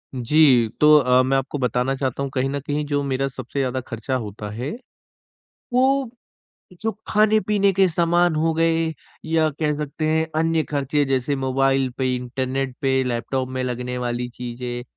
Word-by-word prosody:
जी, 125 -2 +4
तो 150 0 +7
अ, 125 -1 +4
मैं 135 +1 +2
आपको 135 +2 -3
बताना 125 +1 0
चाहता 135 0 -2
हूँ 140 - -3
कहीं 135 0 0
न 140 +1 -2
कहीं 145 +2 -3
जो 145 -1 0
मेरा 135 0 -1
सबसे 130 +1 -6
ज़्यादा 130 -1 -1
खर्चा 120 +2 -4
होता 105 -3 -5
है, 125 +6 -4 1.0
वो 260 0 +2 0.7
जो 225 - 0 0.2
खाने-पीने 210 -1 +3
के 190 0 +4
सामान 170 0 +2
हो 160 +1 +1
गए 165 0 +1 0.3
या 160 -1 +2
कह 150 -1 +1
सकते 150 +1 -4
हैं 160 +1 +2
अन्य 165 -1 +1
खर्चे 145 0 0
जैसे 135 +1 0
मोबाइल 135 0 +1
पे, 130 -1 0
इंटरनेट 130 +1 -3
पे, 130 -1 +2
लैपटॉप 130 +1 -2
में 130 0 -3
लगने 125 0 -3
वाली 120 0 -2
चीज़ें 120 0 -6
135 Hz, 165 wpm, -22 LUFS, 125-155 Hz, 1.0 s, तो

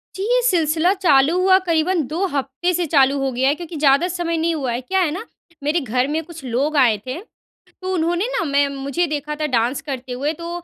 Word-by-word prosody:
जी, 380 - -4
ये - - +3
सिलसिला 335 -4 +2
चालू 330 -4 +3
हुआ 375 0 +5
करीबन 335 +2 +2
2 335 +7 -1
हफ्ते 280 +5 -1
से 350 0 0
चालू 280 -2 +3
हो 270 -1 -1
गया 255 +2 0
है, 285 - +1
क्योंकि 340 0 -8
ज़्यादा 285 +3 +3
समय 345 -2 -2
नहीं 330 +1 0
हुआ 265 -5 -2
है, 240 +2 -2
क्या 380 +9 -1
है 330 -5 +1
ना? 385 +8 -5 0.4
मेरे 300 +4 +1
घर 250 0 0
में 315 +3 -2
कुछ 325 -2 -11
लोग 265 +6 -1
आए 240 -6 +4
थे, 260 +5 -4 0.6
तो 375 0 -3
उन्होंने 345 +2 0
ना - - 0
मैं 285 -1 +2
मुझे 280 +5 -2
देखा 300 0 -3
था - - +1
डांस 245 0 0
करते 260 -3 -6
हुए 280 +5 -2
तो 335 +2 -8
305 Hz, 225 wpm, -20 LUFS, 270-345 Hz, 0.6 s, हुआ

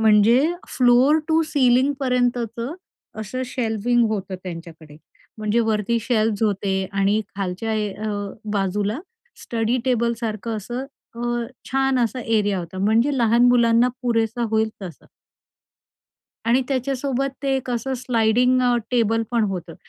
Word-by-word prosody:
म्हणजे 220 +2 +5 0.3
floor 255 +5 +4
to 320 +1 +3
सीलिंगपर्यंतचं, 250 -2 +1 0.5
असं 255 +5 -4
shelving 240 -1 0
होतं 195 -3 -3
त्यांच्याकडे, 165 -4 -9 0.4
म्हणजे 215 +2 +1
वरती 215 +2 +1
शेल्वज 220 -2 0
होते 200 -2 0 0.2
आणि 195 +2 +2 0.2
खालच्या 195 +3 -3
ए 210 -1 -1
अ, 215 +1 -4 0.4
बाजूला 205 +3 -1 0.4
स्टडी 230 +1 -1
टेबलसारखं 230 -3 -1
असं 240 +5 -5 0.4
अ, 240 -1 -1 0.2
छान 270 0 +2
असा 245 +1 0
एरिया 210 -4 +1
होता, 175 +2 -7
म्हणजे 225 +8 +2
लहान 235 +1 +4
मुलांना 235 0 +4
पुरेसा 230 -1 0
होईल 220 0 +2
तसा. 175 -6 -9 1.4
आणि 250 +3 +3
त्याच्यासोबत 270 0 -1
ते 275 -1 +1
एक 260 -1 -5
असं 245 +2 -2
स्लाइडिंग 245 +1 +2
अ, 245 -1 +3 0.2
टेबल 225 -2 +2
पण 235 -2 +2
होतं, 175 -3 -6
230 Hz, 125 wpm, -22 LUFS, 210-250 Hz, 1.4 s, म्हणजे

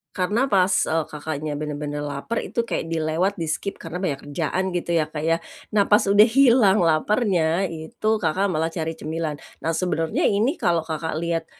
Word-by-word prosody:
Karena 205 +6 0
pas 190 -1 +4
e 160 - 0 0.2
Kakaknya 150 0 -4
bener-bener 150 -1 -4
laper, 145 +10 -3
itu - - -4
kayak - - -2
dilewat 165 +4 0
di-skip 160 +5 -2
karena 165 +2 -5
banyak 140 -7 -1
kerjaan 170 +4 -1
gitu 170 -1 -2
ya, 155 -2 +2
Kak, 150 -1 -4
ya. 165 +1 +2 0.4
Nah 205 - +5
pas 210 - +6
udah 205 +2 +6
hilang 235 -5 +5
lapernya, 175 +1 +2
itu 160 +5 -6 0.2
Kakak 185 +5 +1
malah 160 0 -1
cari 165 -1 -3
cemilan. 160 -1 -3 0.3
Nah 165 - +1
sebenernya 165 -2 -1
ini 220 - +2
kalau 170 -2 +2
Kakak 160 0 -4
lihat, 165 -1 -1
165 Hz, 170 wpm, -23 LUFS, 155-195 Hz, 0.4 s, pas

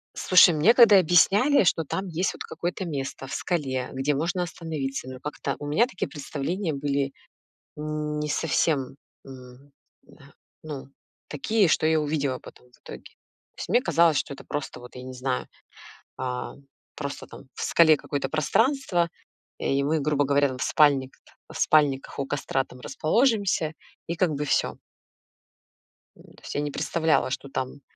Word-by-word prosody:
Слушай, 180 -2 +6
мне 165 +10 +5
когда 220 -6 +8
объясняли, 195 - +4
что 165 -2 +1
там 190 +6 -3
есть 175 +2 -1
вот - - -7
какое-то 180 +2 -4
место 135 -3 -5
в - - -7
скале, 135 -7 -2
где 135 +2 0
можно 170 +5 -1
остановиться, 155 -6 -5
но 130 -1 -8
как-то 150 - -4
у 145 - -6
меня 220 +12 +3
такие 195 -7 -4
представления 155 +5 -3
были 140 -1 -1 0.7
н 150 0 -3
не 150 0 -2
совсем, 145 -4 0 0.3
мгм, 130 +1 -13 0.3
да, - - -19 0.3
ну, 145 -3 -7 0.4
такие, 200 +7 +1
что 155 - +2
я 160 0 +3
увидела 145 -3 -1
потом 125 - -15
в - - -21
итоге. - - -10 0.5
То - - -14
есть - - -5
мне 245 - +4
казалось, 170 - +3
что 140 - -2
это - - -13
просто, 145 -3 -5
вот, 125 +1 -13
я 125 - -8
не 130 - -7
знаю, 125 0 -2 0.7
а, 125 -1 -4 0.4
просто 140 -1 -5
там - - -12
в - - -7
скале 160 -2 +5
какое-то 140 -2 -3
пространство, 185 - +1 0.5
э, - - -6
и 135 0 +1
мы, 155 +2 +1
грубо 145 0 +1
говоря, 140 +1 +3
там 130 -1 -6
в - - -4
спальникт 140 -3 +2 0.3
в - - -7
спальниках 145 -3 +2
у 140 - -2
костра 135 -1 -1
там 125 - -15
расположимся, 195 - +1 0.3
и 170 0 -3
как 180 -3 +2
бы 150 0 -2
всё. - - 0 1.4
Ну, - - -18
то - - -20
есть - - -7
я 145 - 0
не 145 - -3
представляла, 160 -1 +1
что 140 +1 -5
там. 130 +1 -4
150 Hz, 170 wpm, -25 LUFS, 135-170 Hz, 1.4 s, когда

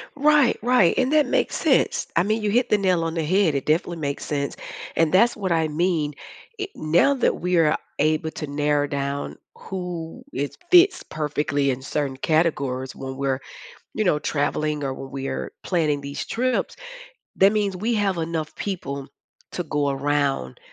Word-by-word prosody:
Right. 290 -3 +4
Right. 240 -7 +4
And 260 +2 +2
that 305 -2 +5
makes - - 0
sense. - - +2
I 170 - +5
mean, 215 +2 0
you 210 - +1
hit 245 +3 +2
the 210 - +4
nail 185 -4 +2
on 165 - -2
the 165 -1 -1
head. 185 -1 +2
It 135 - -2
definitely 165 +2 +1
makes 140 -2 -3
sense. 140 -1 -2 0.4
And 165 0 +2
that's 230 +6 +4
what 190 -3 -2
I 160 -1 +2
mean. 155 -1 0 0.5
I 400 - -2
now 170 - +3
that 265 - +1
we 180 0 +1
are 155 -2 +4 0.2
able 155 +1 +1
to 155 - -5
narrow 145 0 +1
down 140 0 -3 0.2
who 180 +3 -6
it 145 - -3
fits 360 +1 +6
perfectly 150 -2 -1
in 130 0 -4
certain 135 0 -2
categories 135 -4 0
when 130 0 -6
we're, 135 -1 -1 0.6
you 215 - 0
know, 165 -6 +3
traveling 150 0 -1
or 135 - -2
when 135 0 -8
we 135 0 -4
are - - -4
planning 155 -5 +1
these 140 0 -5
trips, 255 +2 -1 0.6
that 195 +1 +5
means 200 -3 0
we 225 +6 0
have 200 -3 +1
enough 160 -1 -3
people 140 -9 -4 0.4
to 180 - -3
go 145 -2 0
around, 140 - -1
160 Hz, 175 wpm, -23 LUFS, 145-195 Hz, 0.6 s, fits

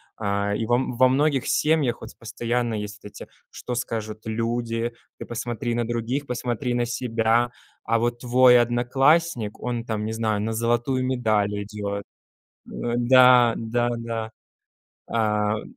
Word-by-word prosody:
а, 100 -1 -1
и 115 - -2
вам 120 +2 0
во 130 +1 +6
многих 140 0 +1
семьях 150 -6 +2
вот 110 - -11
постоянно 120 0 -2
есть 105 0 -6
вот 105 - -8
эти: - - -10 0.2
"Что 125 - -6
скажут 110 -3 -4
люди? 115 +1 -2 0.3
Ты - - -6
посмотри 120 0 -3
на 120 0 0
других, 120 +5 -2
посмотри 125 0 -2
на 120 0 +1
себя". 120 -1 0 0.3
А 115 +1 +1
вот 120 +1 -1
твой 125 0 +5
одноклассник, 120 +1 +1
он 120 -1 -3
там, 110 -2 -3
не 110 - -3
знаю, 110 -2 -1
на 110 +2 -2
золотую 120 +3 0
медаль 110 -5 +1
идет. 100 -1 -5 0.7
Э, 120 0 -3
да 125 -1 +6
да 120 +1 -1
да. 115 -1 -4 0.8
А, 105 -1 +1
э - - -8
120 Hz, 150 wpm, -24 LUFS, 110-125 Hz, 0.8 s, во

